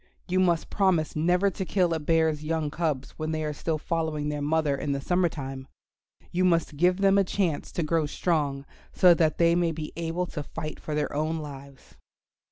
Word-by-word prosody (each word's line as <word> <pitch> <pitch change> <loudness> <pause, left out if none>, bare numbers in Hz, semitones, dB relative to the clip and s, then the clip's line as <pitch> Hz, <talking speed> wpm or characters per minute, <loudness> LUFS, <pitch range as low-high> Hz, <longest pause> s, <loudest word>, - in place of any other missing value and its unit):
You 185 0 +1
must 175 -3 +1
promise 185 -6 +1
never 180 +5 +2
to 190 - -4
kill 180 -2 +1
a 160 - -1
bear's 160 -1 +1
young 155 -1 -1
cubs 155 -5 -2
when 155 0 -2
they 155 0 -2
are 150 -1 -2
still 155 +2 -2
following 155 -2 -2
their 150 -1 -3
mother 150 -1 +1
in 140 +1 -2
the 140 - -2
summer 175 +4 +1
time. 135 -3 -7 0.6
You 180 +1 +1
must 165 -4 +2
give 180 +5 +2
them 195 0 +5
a - - +4
chance 180 -5 -1
to 170 - -1
grow 155 0 +1
strong, 145 -4 -1 0.3
so 180 -1 +6
that 160 -2 +1
they 170 0 +4
may 170 -1 +2
be 155 -1 -6
able 170 +2 -2
to 170 -3 -6
fight 155 +1 -6
for 155 - -4
their 150 -1 -1
own 155 +2 -1
lives." 140 -3 -10
160 Hz, 200 wpm, -27 LUFS, 150-175 Hz, 0.6 s, so